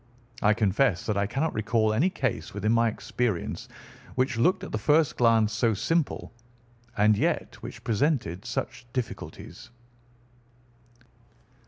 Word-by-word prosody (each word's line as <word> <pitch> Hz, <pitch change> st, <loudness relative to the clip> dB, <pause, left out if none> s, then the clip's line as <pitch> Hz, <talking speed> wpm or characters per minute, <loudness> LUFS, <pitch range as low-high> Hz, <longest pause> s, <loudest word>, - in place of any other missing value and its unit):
I 105 Hz, 0 st, +4 dB
confess 105 Hz, -1 st, +2 dB
that 105 Hz, -, 0 dB
I 100 Hz, 0 st, +1 dB
cannot 140 Hz, +8 st, -1 dB
recall 110 Hz, 0 st, +1 dB
any 145 Hz, +12 st, +3 dB
case 130 Hz, -, -3 dB
within 105 Hz, +1 st, 0 dB
my 115 Hz, 0 st, +4 dB
experience 110 Hz, -3 st, -3 dB, 0.5 s
which 130 Hz, -1 st, +1 dB
looked 180 Hz, -, +2 dB
at -, -, -6 dB
the 110 Hz, -, -2 dB
first 150 Hz, +5 st, +3 dB
glance 115 Hz, -2 st, +3 dB
so 115 Hz, -1 st, +2 dB
simple 160 Hz, -, -1 dB, 0.6 s
and 105 Hz, +1 st, +5 dB
yet -, -, -1 dB
which -, -, -9 dB
presented 110 Hz, -, 0 dB
such 120 Hz, 0 st, -4 dB
difficulties." 125 Hz, -4 st, -6 dB
115 Hz, 130 wpm, -27 LUFS, 105-130 Hz, 0.6 s, and